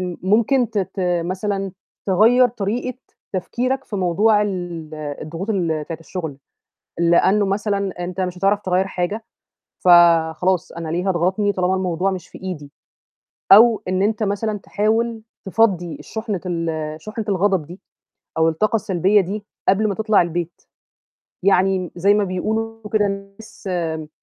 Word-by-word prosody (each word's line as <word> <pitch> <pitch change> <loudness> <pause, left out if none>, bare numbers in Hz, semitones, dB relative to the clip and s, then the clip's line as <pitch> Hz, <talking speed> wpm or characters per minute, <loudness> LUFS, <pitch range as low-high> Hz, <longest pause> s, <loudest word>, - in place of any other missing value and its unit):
آمم، 180 -2 -4
ممكن 230 +5 +2
ت 215 - -1
ت 190 -1 -3 0.3
مثلًا، 195 +1 -2 0.3
تغيّر 230 +6 +5
طريقة 240 +3 -3 0.3
تفكيرك 255 +8 -2
في 205 - -5
موضوع 205 +4 +3
ال 175 -5 -4
الضغوط 155 +5 -5
ال 165 -7 0
بتاعة 165 0 -6
الشُغل، 165 -4 -6 0.6
لأنه 175 +4 +4
مثلًا، 200 -2 -2
أنت 180 +1 -4
مش 180 -1 -3
هتعرف 200 +2 +2
تغيّر 185 0 +1
حاجة، 190 +5 -3 0.6
فخلاص 175 0 +4
أنا 165 -1 -6
ليه، 175 +4 -1
هاضغطني 190 +3 +1
طالما 185 -1 0
الموضوع 185 0 0
مش 185 -2 -6
في - - -12
إيدي؟ 150 -7 -6 0.8
أو 220 0 +7
إن 185 +1 +1
أنت 215 +2 0
مثلًا 205 +1 -1
تحاول 220 +3 -1 0.2
تفضّي 190 -5 +1
الشُحنة 220 -5 -4
ال 160 -3 -3
شُحنة 215 +1 -5
الغضب 190 -4 +1
دي، 175 +4 -11 0.6
أو 160 0 +4
الطاقة 215 +7 +1
السلبية 195 +1 +2
دي، 200 +3 -5 0.2
قبل 210 +3 +3
ما 200 - -1
تطلع 215 -1 +3
البيت. 170 0 -4 0.8
يعني 190 0 +3
م 180 -2 -5
زي 200 +4 +4
ما 205 0 +2
بيقولوا 220 +4 -3
كده 210 -2 +3
الناس 195 +2 -7
آمم، 160 -3 -2
190 Hz, 145 wpm, -21 LUFS, 175-210 Hz, 0.8 s, أو